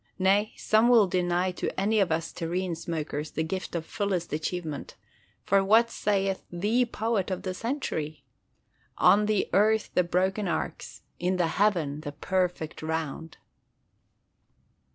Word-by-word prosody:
Nay, 200 +3 +3
some 220 +2 +3
will 230 -4 +7
deny 180 0 0
to 180 - -4
any 215 +3 +2
of 195 -4 +2
us 165 +1 -1
terrene 175 +1 -2
smokers 155 -2 -4
the 160 - -2
gift 185 +2 -4
of 165 -1 -2
fullest 190 -6 -2
achievement: 155 0 -4 0.5
for 195 0 +3
what 225 +4 +4
saith 195 -2 0
the 210 +8 +1
poet 220 -4 -1
of 185 - -3
the 185 - -3
century? 185 - -3 0.7
"On 210 +1 +5
the 215 -2 +1
earth 215 +2 +3
the 180 - +3
broken 190 +4 0
arcs: - - -4 0.2
in 180 +2 0
the 175 -2 +1
heaven 165 -7 +1
the 145 -2 -6
perfect 180 0 -2
round!" 160 0 -4
185 Hz, 140 wpm, -27 LUFS, 165-205 Hz, 0.7 s, will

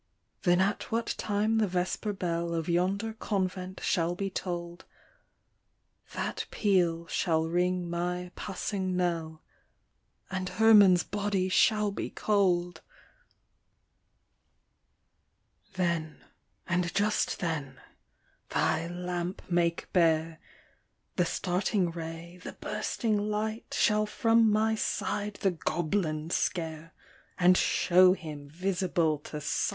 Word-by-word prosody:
" - - -48
Then 175 0 +4
at 200 +2 -1
what 230 +1 0
time 215 +2 +1
the 215 - +2
vesper 185 +3 -1
bell 170 -3 -2
Of 165 -1 -2
yonder 190 +6 0
convent 190 -3 -3
shall 175 -1 +1
be 195 +1 -3
toll'd, 175 -2 -5 1.3
That - - -3
peal 175 -5 +1
shall 160 -1 0
ring 180 +1 0
my 180 +1 -3
passing 190 -1 -3
knell, 165 -3 -2 0.9
And 185 -1 -2
Herman's 205 -5 +6
body 200 -2 -1
shall 210 +2 +3
be - - -4
cold! 180 -4 +1 1.9
" 195 - -39
Then, 170 -4 -1 0.4
and 175 -1 0
just 210 +1 +1
then, 150 -6 -3 0.7
thy 160 +1 +1
lamp 175 +1 -4
make 170 -1 +1
bare* 160 -2 +2 0.8
The 180 - +2
starting 180 +1 0
ray, 165 +1 -7
the - - -7
bursting 215 0 -2
light, 215 +1 -3
Shall 210 0 +3
from 225 0 +3
my 220 +1 +2
side 210 -1 -2
the 195 - +3
goblin 160 -2 -2
scare, 165 -4 -2 0.5
And 180 +1 +5
shew 180 +1 +5
him 150 -5 -8
visible 175 -2 0
to 150 +1 -7
sight!" 150 - 0
180 Hz, 110 wpm, -29 LUFS, 170-200 Hz, 1.9 s, Herman's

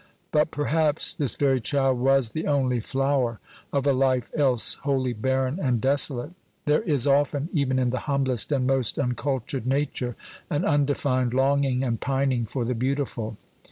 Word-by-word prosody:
But 150 +1 +2
perhaps 150 0 +1
this 145 -8 -2
very 135 -2 +2
child 135 +1 +1
was 135 -2 +3
the 160 - -3
only 130 -4 +1
flower 130 -1 0 0.3
of 140 -1 0
a 140 - +4
life 130 -1 +1
else 130 -6 +2
wholly 135 -3 0
barren 130 - -1
and 125 -4 +1
desolate. 135 +1 +1 0.3
There 150 +4 +3
is 145 - +1
often, 145 +2 +1
even 140 -5 0
in 125 -2 +1
the 130 - -2
humblest 135 -3 0
and 135 -3 +1
most 130 -3 +1
uncultured 130 -1 -2
nature, 130 -3 -1 0.3
an 145 - 0
undefined 140 -4 +1
longing 135 -1 +2
and 115 -4 -2
pining 135 -3 0
for 120 +2 -3
the 125 - -1
beautiful. 120 -3 -2
135 Hz, 160 wpm, -25 LUFS, 125-140 Hz, 0.3 s, a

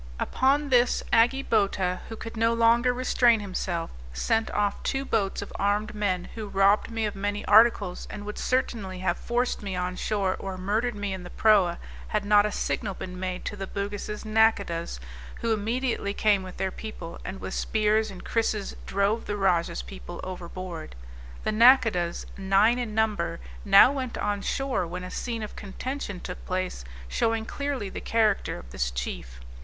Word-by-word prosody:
Upon 280 +3 +2
this 245 -1 +3
Agi 245 +4 +4
Bota, 195 -4 +1
who 225 - -5
could 225 +1 -8
no 230 +1 +2
longer 235 +2 +4
restrain 245 -2 +3
himself, 185 -4 -3 0.2
sent 220 - +1
off 205 -1 0
two 270 0 -1
boats 200 -6 0
of - - -11
armed 205 +2 0
men, 185 -4 -1
who 220 -2 -6
robbed 195 +1 +3
me 225 -1 -1
of 210 - -3
many 205 +1 -2
articles, 210 -4 +4
and 205 -1 -7
would 210 - -5
certainly 225 -7 -1
have 185 -2 +1
forced 240 +4 -1
me 195 -3 -4
on 180 0 -2
shore, 195 -2 0
or 190 -1 -5
murdered 215 +5 0
me 205 -1 -3
in 190 - -5
the 180 - -9
proa 195 -6 +4 0.3
had 210 -2 -1
not 205 0 +5
a - - -4
signal 200 -1 -2
been 180 0 -7
made 185 -1 -4
to - - -3
the 195 -1 -5
Bugis' 205 +2 -4
nacodahs, 205 - +1 0.4
who 230 -1 +1
immediately 225 -1 -1
came 205 -2 +3
with 185 -1 -9
their 190 - -1
people, 185 -7 -8
and 195 - -6
with - - -5
spears 215 0 +1
and 190 -2 -10
krisses, 220 -3 -1
drove 200 +3 +1
the 205 - -3
rajah's 175 - +1
people - - -9
overboard. 180 - -7 0.5
The - - 0
nacodahs, 220 -7 +4
nine 195 +5 +4
in 225 -4 -4
number, 210 -7 0 0.2
now 200 +5 +8
went 260 -4 -4
on 205 -1 -1
shore, 265 -4 -1
when 180 +2 -6
a 180 - -7
scene 230 0 -3
of 210 - -7
contention 205 0 -5
took 180 - -7
place 185 - -2 0.2
showing 225 - 0
clearly 280 -6 -3
the - - -6
character 220 -3 +1
of - - -12
this 60 -2 -1
chief. - - -5
205 Hz, 175 wpm, -27 LUFS, 185-225 Hz, 0.5 s, now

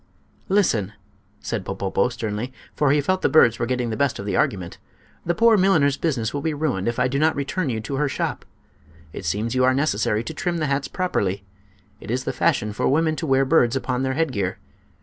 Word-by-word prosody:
"Listen!" 115 - +1 0.5
said 110 -4 -3
Popopo, 95 +3 -1
sternly, 120 0 -4 0.2
for 145 - +2
he 145 +2 +4
felt 185 +6 0
the - - +2
birds 120 -7 +5
were 120 - -1
getting 125 -2 -1
the - - -2
best 140 0 0
of 100 - -6
the 100 - -1
argument; 90 -4 -1 0.5
"the 175 - +1
poor 230 -1 +5
milliner's 160 -8 +3
business 135 -9 -1
will 145 - -2
be 155 0 -1
ruined 145 -11 -1
if 120 - -1
I 125 0 +2
do 135 +2 -1
not 160 +1 +3
return 140 +3 -2
you 115 -3 -2
to 135 +5 -4
her 145 0 +1
shop. - - -3 0.7
It 95 - -7
seems 105 +7 -1
you 130 0 +2
are 130 0 +4
necessary 110 -6 0
to - - -6
trim 175 -1 -2
the 155 - -1
hats 140 -1 -1
properly. 100 - -1 0.6
It - - -11
is 125 +2 -1
the - - -3
fashion 105 0 +1
for - - 0
women 155 +3 +2
to 160 - -3
wear 135 0 +3
birds 130 -4 +3
upon 130 -1 -1
their 130 0 -1
headgear. 115 -13 -1
130 Hz, 215 wpm, -23 LUFS, 110-155 Hz, 0.7 s, birds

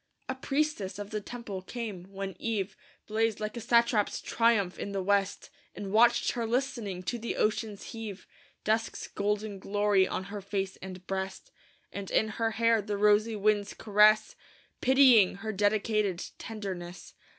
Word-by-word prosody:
A 260 - -1
priestess 265 -8 -1
of 205 0 -7
the 215 -1 -2
temple 210 -4 -6
came, 205 -3 -6
when 195 -1 -5
eve 200 -4 -2 0.3
Blazed, 220 0 0
like 215 +1 -4
a - - -4
satrap's 235 -2 +2
triumph, 225 -6 +1
in 200 - -4
the 195 -1 -1
west; 200 +3 0 0.2
And 200 -2 -6
watched 235 +3 +4
her 235 -2 -2
listening 235 -7 -2
to 240 +6 -3
the 230 - -3
ocean's 215 -1 -1
heave, 220 -4 -7 0.4
Dusk's 220 +1 -1
golden 205 0 -2
glory 205 -1 +2
on 185 - -3
her 205 - -4
face 195 -1 -3
and 185 -1 -9
breast, 190 - -4 0.4
And 200 -1 -5
in 220 - +2
her 225 +1 -1
hair 230 0 +2
the 205 0 -3
rosy 210 +2 +3
wind's 205 0 +1
caress, 215 +1 +4 0.5
Pitying 255 -8 +6
her 210 +3 -4
dedicated 205 -2 +1
tenderness. 190 -5 -7
210 Hz, 150 wpm, -29 LUFS, 195-225 Hz, 0.5 s, Pitying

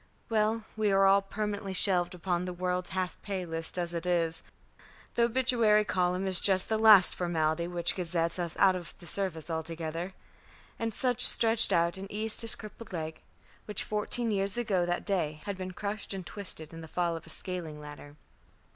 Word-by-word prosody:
Well, 220 0 0
we 215 -2 0
are 195 0 +3
all 195 +1 +4
permanently 205 0 -5
shelved 180 -1 +2
upon 180 0 -3
the 180 - -5
world's 180 0 -3
half 185 -1 -4
pay 190 -3 -5
list 165 +1 -4
as 175 -1 -3
it 170 +1 -4
is. 165 -2 -1 0.7
The 235 - +2
obituary 235 -4 +2
column 180 -1 -1
is 185 -2 +8
just 190 -1 +4
the 220 -1 0
last 215 -4 +7
formality 170 -1 -2
which 175 -1 -1
gazettes 170 -1 -2
us 170 -2 -4
out 190 -1 +4
of 175 -2 -8
the 175 - -15
service 175 -2 -1
altogether," 165 +2 -5 0.6
and 225 0 -2
Sutch 250 -2 -1
stretched 225 0 +6
out 170 +2 +1
and 195 +1 -9
eased 215 +1 +4
his 230 -1 +3
crippled 215 +1 -12
leg, 160 -2 -6 0.4
which 210 - -3
fourteen 220 +2 -2
years 195 +1 -1
ago 195 -7 -1
that 175 0 -3
day 155 -6 -2
had 200 - -4
been 185 0 -7
crushed 200 +2 -5
and 185 -2 -7
twisted 170 -6 -5
in 165 - -9
the 160 - -10
fall 170 +1 -2
of 165 - -10
a - - -13
scaling 170 -5 -2
ladder. 145 -1 -12
185 Hz, 185 wpm, -28 LUFS, 170-210 Hz, 0.7 s, is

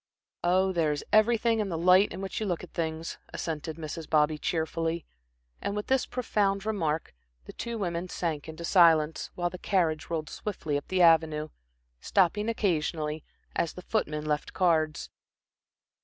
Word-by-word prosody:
"Oh, 185 +2 +3
there 165 -4 +1
is 145 - -3
everything 225 +1 +4
in 210 -2 -1
the 165 - -2
light 185 +4 +5
in 185 - -6
which 195 - -4
you 215 - -2
look 175 -2 -2
at 180 - -11
things," 160 0 -3
assented 160 -1 -4
Mrs. 160 0 -6
Bobby, 150 0 +3
cheerfully. 165 0 -1 0.6
And 200 - -2
with 210 - -3
this 265 -1 +1
profound 205 -5 0
remark, 165 -8 -1 0.3
the - - -10
two 235 -1 -4
women 175 -3 -3
sank 160 -4 -3
into 160 +1 -6
silence, 165 -4 +4
while 175 -1 -1
the 180 - -8
carriage 165 -6 0
rolled 160 -3 -3
swiftly 175 -8 -3
up 145 - -3
the 185 -1 +2
Avenue, 160 -2 +4 0.5
stopping 205 - +2
occasionally, 160 -7 -1 0.3
as 170 - 0
the 180 - -10
footman 150 -9 -1
left 150 -1 -2
cards. 160 -4 +1
170 Hz, 160 wpm, -28 LUFS, 155-195 Hz, 0.6 s, light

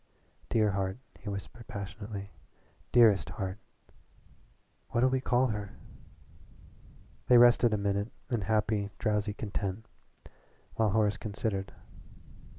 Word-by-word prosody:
"Dear 110 -2 +3
heart," 95 0 -2 0.2
he 105 - -6
whispered 100 +4 -7
passionately 100 -1 -6 0.6
"dearest 110 -8 +5
heart." 95 +4 -4 1.3
"What'll 125 +2 +2
we 130 -1 +1
call 125 0 +2
her?" 105 -3 -4 1.5
They 125 - +7
rested 120 -1 +6
a 105 - +1
minute 100 +2 -1 0.2
in 120 -3 +1
happy, 105 0 0
drowsy 105 -1 0
content, 100 0 -4 0.9
while 110 -1 +2
Horace 105 0 +2
considered. 100 -2 -3
105 Hz, 105 wpm, -30 LUFS, 100-115 Hz, 1.5 s, They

